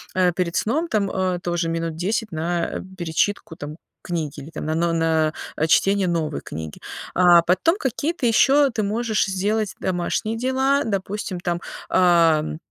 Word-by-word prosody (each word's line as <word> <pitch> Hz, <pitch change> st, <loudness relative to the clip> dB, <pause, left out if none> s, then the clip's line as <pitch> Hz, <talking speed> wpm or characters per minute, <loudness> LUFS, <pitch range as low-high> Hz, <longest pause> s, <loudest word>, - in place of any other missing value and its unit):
э, 180 Hz, -1 st, +3 dB
перед 170 Hz, -1 st, -2 dB
сном, 310 Hz, +10 st, 0 dB
там, 200 Hz, -3 st, +1 dB
э, 185 Hz, -1 st, -1 dB
тоже 175 Hz, -1 st, -1 dB
минут 165 Hz, -1 st, -2 dB
10 210 Hz, +6 st, -2 dB
на 170 Hz, +2 st, -2 dB, 0.2 s
перечитку, 170 Hz, +1 st, -1 dB
там, 150 Hz, 0 st, -8 dB, 0.3 s
книги 165 Hz, -5 st, -3 dB
или, 145 Hz, +3 st, -9 dB
там, 160 Hz, -, -6 dB
на 155 Hz, -, -1 dB, 0.2 s
на, 160 Hz, -1 st, +2 dB, 0.3 s
э, 155 Hz, -, +1 dB
чтение 195 Hz, +3 st, +3 dB
новой 160 Hz, -4 st, -1 dB
книги. 80 Hz, 0 st, -7 dB, 0.3 s
А 175 Hz, -2 st, +6 dB
потом 185 Hz, -, +2 dB
какие-то 295 Hz, -, -2 dB
ещё 270 Hz, +4 st, +4 dB
ты 225 Hz, -, -2 dB
можешь 215 Hz, +1 st, 0 dB
сделать 205 Hz, +2 st, -1 dB
домашние 190 Hz, +4 st, -1 dB
дела, 265 Hz, +3 st, +1 dB
допустим, 200 Hz, -2 st, -3 dB
там, 175 Hz, -1 st, -2 dB, 0.3 s
ам, 165 Hz, -4 st, +3 dB
180 Hz, 150 wpm, -22 LUFS, 165-215 Hz, 0.3 s, А